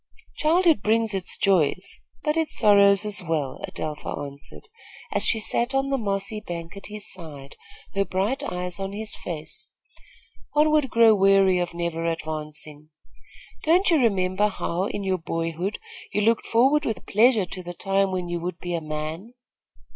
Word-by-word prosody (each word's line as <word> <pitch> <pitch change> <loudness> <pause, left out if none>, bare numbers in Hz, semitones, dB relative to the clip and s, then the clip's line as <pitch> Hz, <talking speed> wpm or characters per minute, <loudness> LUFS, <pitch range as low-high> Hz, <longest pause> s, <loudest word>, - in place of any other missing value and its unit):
"Childhood 325 - +3
brings 220 0 +1
its 190 -2 -1
joys, 185 -2 +1 0.2
but 300 0 +1
its 320 -1 0
sorrows 200 -1 +5
as 210 -2 +2
well," 155 -6 -3
Adelpha 150 -1 -5
answered, 140 - -11 0.4
as - - +2
she 230 - +5
sat 240 +4 +2
on 270 0 0
the 275 - +2
mossy 200 0 -2
bank 170 -3 -7
at 200 - -9
his 210 0 -7
side, 145 -6 -10 0.4
her 195 - +1
bright 195 +8 -1
eyes 180 0 -4
on 195 0 -4
his 215 +1 -1
face. 170 +5 -6 0.8
"One 300 +1 +4
would 300 -3 +2
grow 230 -1 +6
weary 195 -2 +4
of 175 -1 -3
never 170 -1 -3
advancing. 155 -2 -5 0.7
Don't 355 +4 +3
you 330 - +5
remember 195 -3 +2
how, 185 -2 -2
in 205 0 -4
your 190 -1 0
boyhood, 165 +4 -3 0.3
you 210 - 0
looked 225 +2 +2
forward 270 +6 +3
with 220 -9 -3
pleasure 220 -1 +4
to 185 +1 -8
the 175 0 -8
time 195 +1 +1
when 180 -1 -3
you 175 0 -3
would 175 0 -4
be 175 -1 -5
a 170 - -1
man?" 155 +9 -6
195 Hz, 165 wpm, -24 LUFS, 170-220 Hz, 0.8 s, grow